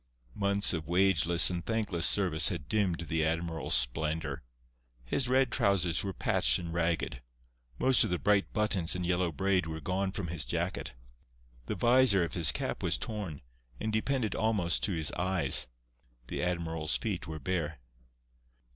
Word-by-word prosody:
Months 100 +3 +1
of 80 -3 -4
wageless 85 -1 +4
and 85 -1 -4
thankless 105 -7 0
service 90 -5 +2
had 80 -6 -6
dimmed 95 -5 0
the 80 -1 -1
admiral's 80 +1 0
splendour. 75 +7 0 0.6
His 125 - 0
red 130 -1 +2
trousers 90 -4 +1
were 100 - -3
patched - - +2
and 85 -2 -6
ragged. 85 -6 -1 0.6
Most 130 -2 +4
of - - -2
the 90 - 0
bright 100 +2 +1
buttons 100 -6 -1
and 90 -1 -3
yellow 90 -1 0
braid 90 +3 0
were 80 0 -5
gone 95 +3 -2
from 95 -3 -5
his 80 -2 0
jacket. 85 -6 -3 0.7
The - - -3
visor 120 -6 +4
of 85 - -4
his 80 -6 +5
cap - - -4
was - - +1
torn, 100 -11 -5 0.4
and 110 - -3
depended 115 0 -1
almost 105 -6 0
to 105 - -2
his 80 -3 -2
eyes. 90 -6 +2 0.6
The - - -3
admiral's 80 -3 -1
feet 95 -6 -4
were 80 0 -6
bare. 75 -2 -3
90 Hz, 155 wpm, -30 LUFS, 80-100 Hz, 0.7 s, his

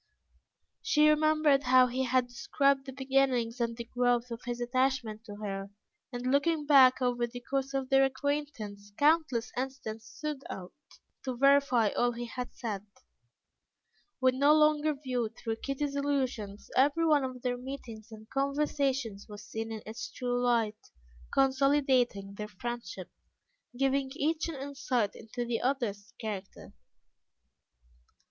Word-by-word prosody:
She 300 0 +4
remembered 305 -2 +4
how 255 -1 +6
he 255 +1 -1
had 255 0 +2
described 275 +2 +1
the - - -5
beginnings 260 -3 +1
and 230 -1 -1
the 235 - -4
growth 245 0 0
of 230 +1 -5
his 240 0 -3
attachment 245 -3 0
to 205 -2 -8
her, 200 -1 -5 0.4
and 245 -1 -5
looking 295 +2 +2
back 265 -3 +6
over 245 -1 +1
the 245 +1 -9
course 270 +2 -2
of 265 -1 -2
their 270 0 +5
acquaintance, 260 -7 -3
countless 295 -6 +2
incidents 245 -4 -5
stood 300 -3 -5
out, 180 -1 -7 0.5
to 255 -2 -3
verify 275 -4 +4
all 240 +3 +1
he 240 +1 -5
had 250 +1 -6
said. 210 -5 -4 1.4
When 260 0 +2
no 290 +2 +6
longer 305 0 +3
viewed 250 -5 -3
through 225 -1 -3
Kitty's 280 +3 -3
illusions, 260 -8 -2
every 290 +5 +3
one 300 -3 +4
of 255 -1 -5
their 245 -1 -1
meetings 245 -4 -8
and 220 0 -11
conversations 275 -6 -1
was 210 0 -9
seen 225 +1 -5
in 220 -1 -6
its 220 +2 -6
true 245 -1 -2
light, 225 -3 0 0.4
consolidating 265 -6 +2
their 210 - -3
friendship, 210 -3 -6 0.7
giving 270 0 +1
each 320 +2 0
an 325 - -5
insight 270 -5 -1
into 240 +2 -6
the 235 -1 -2
other's 235 -6 -2
character. 205 -4 -6
255 Hz, 140 wpm, -30 LUFS, 230-275 Hz, 1.4 s, how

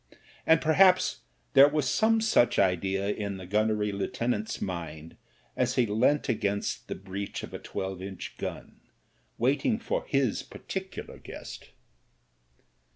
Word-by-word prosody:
And 160 0 +6
perhaps 185 +4 +4 0.3
there 140 0 +9
was 145 -2 0
some 220 - +3
such 220 - +3
idea 95 +1 +1
in 100 -2 -3
the 95 - -8
gunnery 105 +1 +1
lieutenant's 110 +2 -2
mind 85 -3 -5 0.4
as 125 0 0
he 125 - +3
leant 115 +7 +2
against 100 -4 -1
the - - -4
breech 100 +1 -6
of - - -8
a - - -5
twelve 95 -1 -5
inch 95 -1 -7
gun, - - -6 0.6
waiting 140 - +2
for 230 - -2
his 135 -5 +1
particular - - -7
guest. - - -10
110 Hz, 130 wpm, -28 LUFS, 95-140 Hz, 0.6 s, there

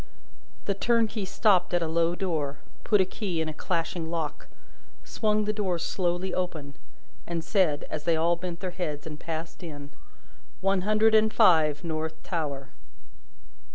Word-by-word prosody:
The 200 - +1
turnkey 225 0 +1
stopped 190 -2 +3
at 175 - +2
a - - -1
low 165 +1 +2
door, 155 -7 -2 0.3
put 210 -3 +4
a - - +3
key 185 -3 -3
in 160 - 0
a 155 - -4
clashing 165 0 -2
lock, 160 -3 -3 0.6
swung 215 -1 0
the 210 - 0
door 195 -5 0
slowly 175 +1 -1
open, 160 -6 -3 0.5
and 170 -1 -2
said, 165 -8 +2
as 150 - -4
they 170 -1 +3
all 165 +2 +3
bent 175 0 -6
their 185 -2 -3
heads 155 -5 -4
and 150 -1 -7
passed 165 +1 -5
in: 145 -4 -8 0.7
"One 195 0 +2
hundred 215 +3 +3
and 220 0 +5
five, 160 -9 +4
North 160 -1 -3
Tower!" 140 -6 -3
175 Hz, 155 wpm, -27 LUFS, 160-195 Hz, 0.7 s, and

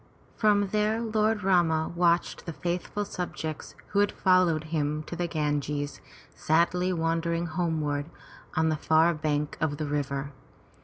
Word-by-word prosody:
From 205 -2 +3
there 215 +2 +1
Lord 215 -2 +1
Rama 170 -4 +2
watched 170 0 +1
the 165 - -3
faithful 180 +5 -3
subjects 160 -5 -5
who 200 - +1
had 205 0 +3
followed 185 -4 +3
him 150 0 0
to 175 - -7
Ganges, 145 -2 -2 0.3
sadly 175 +3 +2
wending 165 0 0
homeward 155 -4 -1 0.5
on 160 0 +2
the 155 - 0
far 160 +3 +4
bank 150 -1 -2
of 150 -3 0
the 155 - -2
river. 140 -1 -2
165 Hz, 135 wpm, -28 LUFS, 150-180 Hz, 0.5 s, far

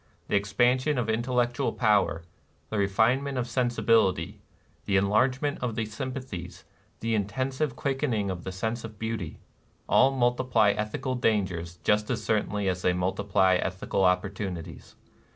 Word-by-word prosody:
The - - +1
expansion 125 +8 +2
of 125 - 0
intel 120 +3 -1
lectual 120 +1 -3
power, 105 -7 +2 0.5
the 110 - -1
refinement 120 +8 +2
of 125 -1 -1
sensibility, 115 -6 +1 0.5
the 100 - +2
enlargement 125 +8 +1
of 120 -3 -2
the 115 - -1
sympathies, 115 -6 -6 0.4
the 115 0 -1
in 105 -3 +1
tensive 130 +4 -2
quickening 130 -8 -1
of 90 -2 -6
the 95 - -5
sense 110 +5 -3
of 110 -2 -9
beauty, 110 -7 -4 0.3
— - - -38
all 135 - +5
multiply 120 -4 +2
ethical 105 +5 -3
dangers 95 -8 -1
just 105 0 +2
as - - -2
certainly 105 -2 0
as 90 -1 -1
they 90 - +2
multiply 95 0 +2
ethical 95 +1 -1
opportunities. 90 -1 -2
110 Hz, 145 wpm, -27 LUFS, 95-125 Hz, 0.5 s, all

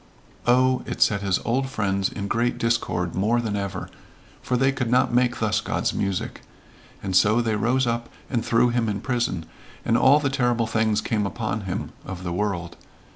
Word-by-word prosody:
Oh, 130 +1 +4
it - - -5
set 100 -1 +3
his 95 -2 +1
old 130 +3 0
friends 100 -5 0
in 100 - -5
great 120 +3 0
discord 115 -7 0
more 110 +5 +1
than 110 -3 -2
ever 100 -2 -4 0.5
for 125 - 0
they 135 +2 +3
could 130 -3 -2
not 125 0 +3
make 125 0 +2
thus 105 -1 +1
God's - - -1
music. 100 -2 -2 0.6
And 95 -2 -2
so 105 +5 +5
they 115 -2 0
rose 125 +5 +1
up 115 0 -2 0.2
and 120 -3 -1
threw 115 +2 +3
him 120 -2 0
in 100 -1 -3
prison, 120 - -1 0.4
and 115 - +2
all 135 +4 +6
the 140 -3 -1
terrible 120 -3 +1
things 110 -1 +1
came 105 -2 0
upon 110 -1 -3
him 90 - -4
of 90 -1 -7
the 85 -2 -3
world. 90 -3 -2
115 Hz, 185 wpm, -24 LUFS, 100-120 Hz, 0.6 s, all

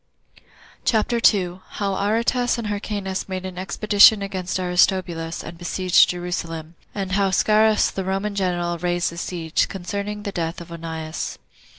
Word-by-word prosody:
CHAPTER 235 +1 +1
2. 185 -5 +2
How 200 -1 -1
Aretas 230 +5 +1
And 235 - -4
Hyrcanus 200 -2 -3
Made 185 0 -4
An 185 -1 -6
Expedition 205 +2 +5
Against 190 -2 -3
Aristobulus 180 -2 +1
And 165 +1 -9
Besieged 180 +1 +3
Jerusalem; 170 -2 -4 0.2
And 195 -2 -3
How 195 0 +2
Scaurus 215 +3 +3
The 195 - -3
Roman 195 +2 -2
General 175 -3 -1
Raised 175 0 0
The 170 - -10
Siege. 170 -2 -1
Concerning 200 +2 -5
The 205 - -3
Death 165 -2 -3
Of 170 0 -11
Onias. 160 -1 -5
185 Hz, 145 wpm, -22 LUFS, 175-205 Hz, 0.2 s, Expedition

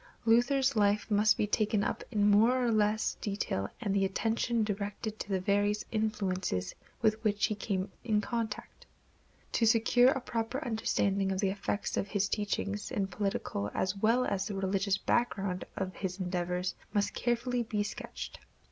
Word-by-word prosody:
Luther's 250 +4 +3
life 205 +1 +2
must 210 +1 +4
be - - +2
taken 210 0 +1
up - - -2
in 210 -3 +2
more 225 +5 +5
or 235 - +2
less 215 0 +2
detail 195 - -2
and 205 -5 -1
the 200 -1 +2
attention 225 +4 0
directed 210 +1 -3
to - - -5
the 190 -1 +1
various 205 +2 +1
influences 195 - -1 0.3
with 220 0 +2
which 210 -1 +2
he - - 0
came 195 -2 -2
in 215 -3 +2
contact. 220 0 -4 0.6
To 230 - +2
secure 235 +3 +5
a 270 0 +1
proper 240 +3 -3
understanding 200 -4 +1
of 190 - -1
the 195 -2 +2
effects 205 +1 -2
of - - 0
his 205 -1 0
teachings, 205 0 -2
the 200 - 0
political 195 - -2
as 185 +1 0
well 230 +5 +2
as 195 0 -1
the 205 - -4
religious 195 0 +1
background 195 -5 0
of 190 -1 -3
his 190 -1 -4
endeavors 180 0 -1 0.2
must 205 -1 0
be - - -5
carefully 240 -3 0
sketched. 205 - -7
210 Hz, 165 wpm, -31 LUFS, 195-225 Hz, 0.6 s, more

